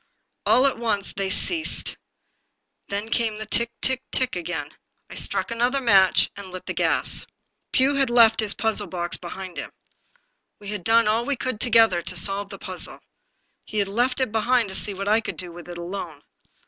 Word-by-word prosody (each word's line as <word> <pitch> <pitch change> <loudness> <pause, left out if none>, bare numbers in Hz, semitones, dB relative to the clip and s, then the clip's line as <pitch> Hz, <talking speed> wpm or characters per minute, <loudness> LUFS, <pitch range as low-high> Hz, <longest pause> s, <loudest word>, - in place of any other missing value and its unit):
All 255 - +5
at 270 -4 0
once 210 -4 -1
they 195 -1 -1
ceased. 320 - +2 0.9
Then 205 +2 -3
came 225 -2 0
the 220 - -6
tick, 235 +2 +1
tick, 260 0 +1
tick 255 -4 +1
again. 160 -4 -4 0.4
I - - -7
struck - - +1
another 245 +4 +1
match 195 -7 +4
and 200 -1 -9
lit 185 0 -9
the - - -3
gas. - - +2 0.4
Pugh 265 +2 +3
had 275 -2 +2
left 230 -2 +5
his 215 -2 0
puzzle 220 -2 +1
box 175 -1 -3
behind 185 +1 -8
him. - - -5 0.9
We 205 -1 -9
had 205 -3 -4
done 230 +1 +4
all 220 +2 +1
we 285 +3 -1
could, 255 -3 -3
together, 225 -6 +4
to 180 - -2
solve 195 +3 +2
the 200 - -9
puzzle. 185 -2 -6 0.6
He 215 - -7
had 200 -1 +1
left 245 +6 0
it 260 -4 0
behind 225 0 +1
to - - -2
see 200 0 0
what 195 +1 -5
I 215 +2 +3
could - - -6
do 180 -2 -4
with 175 +1 -12
it 175 - -7
alone. 170 -4 -7
210 Hz, 190 wpm, -23 LUFS, 190-235 Hz, 0.9 s, All